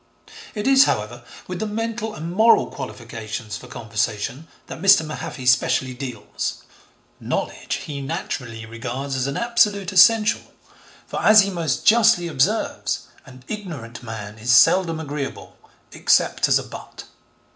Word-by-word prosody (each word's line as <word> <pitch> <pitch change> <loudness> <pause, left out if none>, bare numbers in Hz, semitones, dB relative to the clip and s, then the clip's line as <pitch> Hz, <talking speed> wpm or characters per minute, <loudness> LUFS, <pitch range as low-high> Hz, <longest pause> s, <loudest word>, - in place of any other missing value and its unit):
It 210 0 -3
is, 270 +1 +6
however, 110 +3 -2 0.2
with 180 -1 -5
the 220 - -2
mental 225 0 -4
and 165 -1 -6
moral 220 +5 +4
qualifications 110 -2 -7
for 125 - -10
conversation 115 +4 -3 0.2
that - - -9
Mr. 195 -4 +6
Mahaffy 150 -3 -7
specially 130 +1 +2
deals. 125 -3 -5 0.6
Knowledge - - -3
he, 140 -2 -6
naturally, 130 -7 -5
regards 120 +5 -5
as 130 0 -1
an 140 - -3
absolute 210 -5 +1
essential, 210 +3 +5 0.6
for, - - -5
as 215 0 +8
he 200 0 -1
most 165 -7 -2
justly 220 -6 +5
observes, 165 +8 0 0.3
'an 130 -1 -14
ignorant 160 - -7
man 110 -2 -8
is 120 +3 0
seldom 165 +4 +4
agreeable, 145 -3 -6 0.4
except - - +2
as - - +4
a - - -3
butt.' - - -10
150 Hz, 135 wpm, -22 LUFS, 120-200 Hz, 0.6 s, as